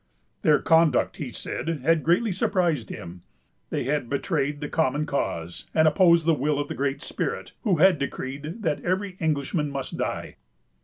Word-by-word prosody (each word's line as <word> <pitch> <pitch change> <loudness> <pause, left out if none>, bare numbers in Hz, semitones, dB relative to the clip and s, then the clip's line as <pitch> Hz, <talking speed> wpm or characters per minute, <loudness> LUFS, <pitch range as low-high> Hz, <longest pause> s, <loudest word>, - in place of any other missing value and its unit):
Their 150 -1 +5
conduct, 165 -1 +3
he - - -5
said, - - -5 0.2
had 165 +2 +3
greatly 185 +7 +2
surprised 170 - 0
him. 85 +1 -8 0.5
They - - -1
had 135 -2 -1
betrayed 145 0 -1
the 145 - -4
common 150 -1 0
cause, 85 - -3
and 160 0 +5
opposed 170 0 +5
the 165 - +4
will 145 +1 0
of 145 0 -2
the - - -2
Great 140 0 -2
Spirit, - - -3
who 205 -7 +3
had 175 0 +5
decreed 140 - -5
that 155 -5 -1
every 185 +1 -1
Englishman 150 -1 0
must 135 -2 -5
die. - - -3
150 Hz, 165 wpm, -25 LUFS, 140-170 Hz, 0.5 s, Their